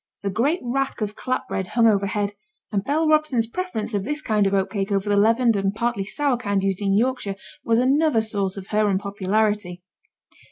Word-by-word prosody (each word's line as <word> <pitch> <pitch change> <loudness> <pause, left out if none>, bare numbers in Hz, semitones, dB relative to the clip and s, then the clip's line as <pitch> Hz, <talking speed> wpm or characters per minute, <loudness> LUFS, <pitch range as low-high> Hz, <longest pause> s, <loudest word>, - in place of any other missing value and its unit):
The 200 - -1
great 280 - +1
rack 270 +2 -2
of 210 0 -2
clap 255 0 -3
bread 190 - -3
hung 230 +3 +2
overhead, 200 -1 +1 0.4
and 200 -2 0
Bell 310 +5 +1
Robson's 305 -7 +2
preference 235 - -4
of 200 -2 0
this 295 +7 -2
kind 210 -7 +1
of 195 - -1
oat 190 -1 0
cake 200 -1 -2
over 195 0 0
the 205 - +2
leavened 230 +3 +3
and 195 0 0
partly 235 -3 -1
sour 275 +4 0
kind 200 -4 -1
used 195 0 -1
in 195 -1 +2
Yorkshire 235 -4 0 0.3
was 225 -1 +2
another 270 -1 +3
source 200 -3 -2
of 195 0 -8
her 215 0 +2
unpopularity. 200 -1 -1
215 Hz, 195 wpm, -23 LUFS, 200-250 Hz, 0.4 s, leavened